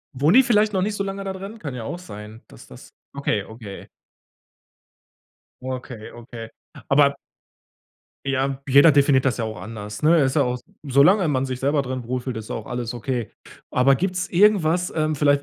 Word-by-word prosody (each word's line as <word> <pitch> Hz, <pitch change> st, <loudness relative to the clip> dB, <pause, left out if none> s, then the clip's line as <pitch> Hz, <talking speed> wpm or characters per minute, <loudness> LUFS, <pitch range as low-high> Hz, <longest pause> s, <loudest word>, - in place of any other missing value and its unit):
Wohnen 150 Hz, -, +3 dB
die 265 Hz, -, +8 dB
vielleicht 215 Hz, -3 st, +2 dB
noch 185 Hz, -1 st, +1 dB
nicht 210 Hz, 0 st, -2 dB
so 200 Hz, -, -2 dB
lange 195 Hz, 0 st, -5 dB
da 190 Hz, -1 st, -4 dB
drin? 195 Hz, +4 st, -8 dB
Kann 145 Hz, -10 st, -6 dB
ja 120 Hz, -3 st, -6 dB
auch 175 Hz, -, -4 dB
sein, 110 Hz, -, -11 dB
dass -, -, -15 dB
das -, -, -14 dB, 0.2 s
okay, 110 Hz, -8 st, -1 dB
okay. 110 Hz, -3 st, -10 dB, 1.7 s
Okay, 125 Hz, -3 st, -6 dB
okay. 115 Hz, -1 st, -10 dB, 0.4 s
Aber 140 Hz, 0 st, +4 dB, 1.1 s
Ja, 135 Hz, 0 st, -1 dB
jeder 140 Hz, +3 st, +7 dB
definiert 140 Hz, -2 st, +4 dB
das 130 Hz, -, +2 dB
ja 115 Hz, -, -3 dB
auch 110 Hz, -1 st, -5 dB
anders, 105 Hz, 0 st, -8 dB
ne? 160 Hz, +3 st, +5 dB
Es 135 Hz, -, +3 dB
ist -, -, -6 dB
ja 140 Hz, -, +4 dB
auch 125 Hz, 0 st, -1 dB, 0.3 s
solange 155 Hz, +7 st, +4 dB
man 135 Hz, -2 st, 0 dB
sich 130 Hz, -1 st, -4 dB
selber 140 Hz, +1 st, +1 dB
drin 130 Hz, -2 st, -5 dB
wohlfühlt, 125 Hz, -2 st, -3 dB
ist 110 Hz, -, -7 dB
auch -, -, -5 dB
alles 125 Hz, -1 st, -4 dB
okay. 120 Hz, -1 st, -3 dB, 0.4 s
Aber 135 Hz, +2 st, +4 dB
gibt's 185 Hz, +3 st, -2 dB
irgendwas, 180 Hz, -3 st, +3 dB, 0.2 s
vielleicht, 145 Hz, 0 st, +3 dB
135 Hz, 180 wpm, -22 LUFS, 120-170 Hz, 1.7 s, die